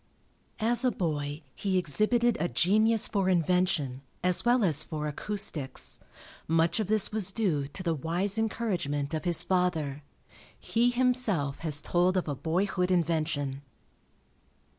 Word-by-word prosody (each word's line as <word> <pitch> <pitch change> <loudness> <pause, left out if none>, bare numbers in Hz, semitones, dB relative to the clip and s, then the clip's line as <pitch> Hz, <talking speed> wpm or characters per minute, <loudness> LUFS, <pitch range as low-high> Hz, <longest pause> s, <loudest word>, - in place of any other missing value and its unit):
As 235 +3 +4
a 255 - +4
boy 150 -6 -3
he 195 -2 -1
exhibited 215 - +2
a 175 - 0
genius 215 +6 +3
for 195 -3 0
invention, 175 -6 +1 0.2
as 180 -1 +2
well 240 0 +3
as 155 -6 +3
for 155 -2 -5
acoustics. 160 -3 -1 0.5
Much 165 +4 +2
of 215 - -1
this 215 0 +3
was 210 -3 0
duo 170 -11 -1
to 185 +6 -8
the 170 -2 0
wise 175 +7 0
encouragement 175 -11 -2
of 160 +3 -3
his 175 -2 +2
father. 165 -6 -1 0.6
He 235 +2 +1
himself 245 - 0
has 150 -3 -2
told 180 +2 +1
of 180 - -1
a 145 - -1
boyhood 180 +6 -1
invention. 155 -5 -1
180 Hz, 140 wpm, -28 LUFS, 150-210 Hz, 0.6 s, As